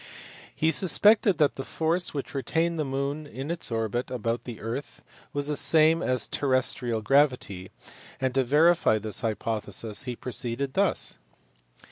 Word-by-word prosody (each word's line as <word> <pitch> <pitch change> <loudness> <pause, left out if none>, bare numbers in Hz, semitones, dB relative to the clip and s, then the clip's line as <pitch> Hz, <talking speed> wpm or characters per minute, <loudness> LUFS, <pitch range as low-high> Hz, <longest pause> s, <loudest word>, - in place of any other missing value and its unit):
He 160 +1 +2
suspected 200 +4 +4
that 150 -1 +2
the 135 - -4
force 165 +5 -1
which 140 -2 -6
retained 165 +4 -1
the - - +1
moon 140 +2 -3
in 135 +3 -6
its 170 - -4
orbit 115 +2 -2
about 115 -2 -3
the 120 -3 -8
earth 115 +6 -6 0.3
was 145 0 -3
the 150 0 -1
same 160 +3 +5
as 130 -5 0
terrestrial 130 -4 0
gravity, 125 -8 +1 0.5
and 130 -1 -1
to 135 0 +2
verify 150 -2 +3
this 110 0 -3
hypothesis 110 0 -3
he 125 -2 -4
proceeded 125 +2 -4
thus. 200 +3 0
135 Hz, 145 wpm, -26 LUFS, 115-155 Hz, 0.5 s, same